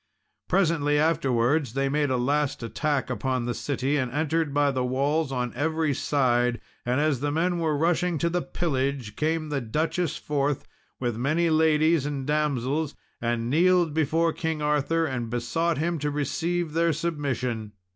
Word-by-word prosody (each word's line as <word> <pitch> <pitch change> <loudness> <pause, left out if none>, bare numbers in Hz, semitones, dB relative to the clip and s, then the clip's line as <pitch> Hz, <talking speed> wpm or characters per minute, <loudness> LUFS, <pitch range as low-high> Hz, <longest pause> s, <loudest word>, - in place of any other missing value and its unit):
] - - -51
Presently 165 -6 +2
afterwards, 140 -4 +2
they 135 0 +1
made 145 +1 +1
a 130 - +1
last 140 +1 0
attack 140 +3 -1
upon 130 -1 -1
the 120 - -1
city, 140 +2 -1
and 130 -3 -1
entered 155 +2 0
by 145 0 +2
the 130 -1 -1
walls 140 +4 0
on 125 -2 -2
every 160 0 0
side; 125 -4 +1 0.2
and 125 +3 0
as 150 -4 +1
the 145 +2 -1
men 170 +3 0
were 155 -3 +1
rushing 170 +2 +1
to 170 - 0
the 175 +1 0
pillage, 135 -10 -2
came 155 0 -1
the 145 -2 -1
Duchess 155 +7 -1
forth, 145 -1 -1 0.3
with 120 -3 -2
many 155 +7 +1
ladies 155 -1 +3
and 140 -2 -3
damsels, 150 0 0 0.3
and 115 -1 -1
kneeled 175 +3 +3
before 160 +2 +1
King 160 -1 -2
Arthur; 150 +2 +1
and 120 -6 -3
besought 150 +8 -1
him 165 +2 -1
to 150 +1 -1
receive 160 +3 -1
their 165 0 +2
submission. 130 -9 -2
145 Hz, 165 wpm, -26 LUFS, 130-160 Hz, 0.3 s, ladies